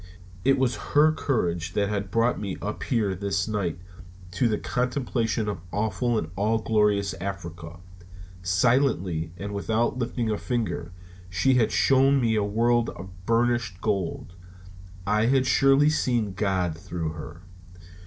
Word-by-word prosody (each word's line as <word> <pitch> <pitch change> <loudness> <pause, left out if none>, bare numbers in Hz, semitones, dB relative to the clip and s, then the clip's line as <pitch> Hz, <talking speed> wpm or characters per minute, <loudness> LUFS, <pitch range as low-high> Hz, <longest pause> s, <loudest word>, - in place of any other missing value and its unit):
It 135 +3 +4
was 130 -2 +1 0.2
her 155 +1 +7
courage 85 - -1
that 100 +1 +1
had 100 -1 -2
brought 115 +4 +1
me 100 -3 -4
up 105 +3 -5
here 110 -6 0
this 95 0 -1
night 100 -6 -2 0.5
to 95 +7 +1
the 110 -2 0
contemplation 125 -3 -1
of 100 -5 -3
awful 110 +3 0
and 80 -6 -3
all 105 +4 +1
glorious 105 -3 +1
Africa. 85 -4 -6 0.6
Silently 90 - +1
and 100 +1 -5
without 110 +5 0
lifting 120 -1 -1
a 105 - -1
finger, 110 -8 -2 0.4
she 90 +9 +2
had 120 -3 +3
shown 135 +1 +4
me 115 -3 +2
a 105 -1 +2
world 115 +3 +2
of 95 0 -9 0.2
burnished 115 -5 +1
gold. 95 -4 -2 0.7
I 105 +2 +2
had 130 0 +3
surely 135 +3 +4
seen 120 -9 0
God 95 -4 0
through 85 0 -4
her. 80 +2 -9
105 Hz, 145 wpm, -26 LUFS, 95-120 Hz, 0.7 s, her